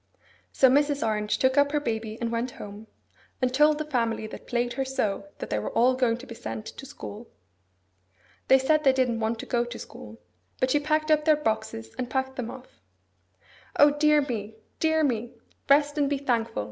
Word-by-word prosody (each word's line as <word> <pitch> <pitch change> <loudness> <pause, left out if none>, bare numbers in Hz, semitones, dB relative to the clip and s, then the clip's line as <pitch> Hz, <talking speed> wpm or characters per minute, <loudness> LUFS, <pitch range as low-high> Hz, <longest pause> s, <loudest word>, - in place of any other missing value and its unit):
So 265 - +5
Mrs. 285 0 +2
Orange 210 -1 0
took 260 +2 +3
up 285 0 +3
her 295 - +2
baby 220 -5 -3
and 235 -1 -2
went 235 +2 -1
home, 205 +2 -9 0.5
and 255 -1 0
told 300 +2 +4
the 310 - -3
family 230 -6 -1
that 215 - -10
plagued 240 0 -1
her 270 - -1
so 215 -7 -2
that - - -7
they 105 - +1
were 105 - -3
all 250 +2 +4
going 250 -3 +1
to 250 - -11
be 250 - -9
sent 215 -1 -6
to 270 - -9
school. 230 -4 -9 1.2
They 265 - +7
said 305 +3 +2
they 270 -2 +5
didn't 250 -3 +1
want 225 +1 -1
to - - -8
go 240 -1 +1
to 240 0 -7
school; 105 +1 -11 0.4
but 255 0 +1
she 295 - +3
packed 310 +1 0
up 305 0 +4
their 310 -1 +6
boxes, 220 - -3
and 250 -1 -2
packed 265 0 -2
them 245 -3 -4
off. 255 - -12 0.9
'O 290 0 +6
dear 300 0 +3
me, 220 -5 -5 0.2
dear 315 -1 +2
me! 240 -3 -1 0.4
Rest 290 +1 +4
and 285 -1 +2
be 285 - 0
thankful! 235 -4 -1
255 Hz, 200 wpm, -26 LUFS, 225-285 Hz, 1.2 s, They